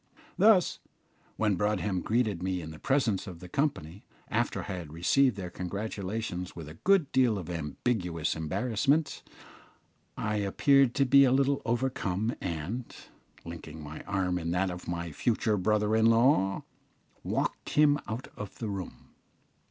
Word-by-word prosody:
Thus, 205 -3 +4 0.6
when 105 -2 +2
Broadhem 105 -1 0
greeted 110 -6 0
me 95 0 -1
in 80 -2 -7
the 80 - -11
presence 130 -8 +1
of 90 -3 -8
the 90 - -10
company, 100 - -2 0.3
after - - 0
I 95 - -5
had 80 -4 -9
received 120 - +3
their 90 -3 -6
congratulations 100 0 -4
with 80 -3 -8
a 75 - -9
good 195 -7 +3
deal 125 -5 +3
of 90 -2 -6
ambiguous 85 - -2
embarrassment, 125 - 0 1.0
I 105 -1 -1
appeared 130 +6 +3
to 140 - +3
be 140 +2 +7
a 130 - +4
little 140 +1 +2
overcome, 115 -3 -1
and, 90 +8 -3 0.6
linking 80 -2 -8
my 75 +1 -8
arm 95 -3 0
in 85 -1 -3
that 90 +2 0
of 90 0 -8
my 85 -1 -3
future 110 - +1
brother 105 +2 +1
in 110 0 +4
law, 115 -4 +3 0.6
walked - - -2
him 145 -1 +5
out 115 +4 -5
of 105 -1 -8
the 110 - -4
room. 95 -2 -7
105 Hz, 150 wpm, -29 LUFS, 90-125 Hz, 1.0 s, be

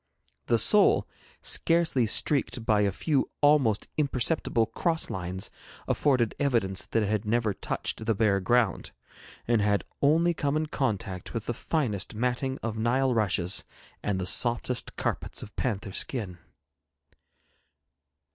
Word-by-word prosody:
The 120 - +3
sole, 205 - +5 0.4
scarcely 165 -8 +2
streaked 120 -1 +2
by 105 -2 +3
a 100 -1 +2
few 140 - 0
almost 145 -8 +3
imperceptible 135 -4 +1
cross 165 +6 -1
lines, 95 +1 -4 0.4
afforded 130 -6 +1
evidence 115 -9 0
that 115 - 0
it - - -1
had 105 0 -1
never 110 -1 0
touched 110 - -4
the 110 -1 0
bare 100 -2 +2
ground, 115 0 +1 0.5
and 115 -2 +2
had 100 0 +1 0.2
only 165 +4 +3
come 145 -2 -1
in 155 - 0
contact 105 - -3
with 115 - -3
the 120 - -2
finest 115 - -2
matting 125 +3 -1
of 110 -1 -3
Nile 125 +3 +1
rushes 95 -5 +1 0.4
and 100 -2 -1
the 90 - -2
softest 120 +4 0
carpets - - -3
of 105 - -12
panther 105 -5 -2
skin. 100 -10 -3
115 Hz, 135 wpm, -27 LUFS, 105-135 Hz, 0.5 s, sole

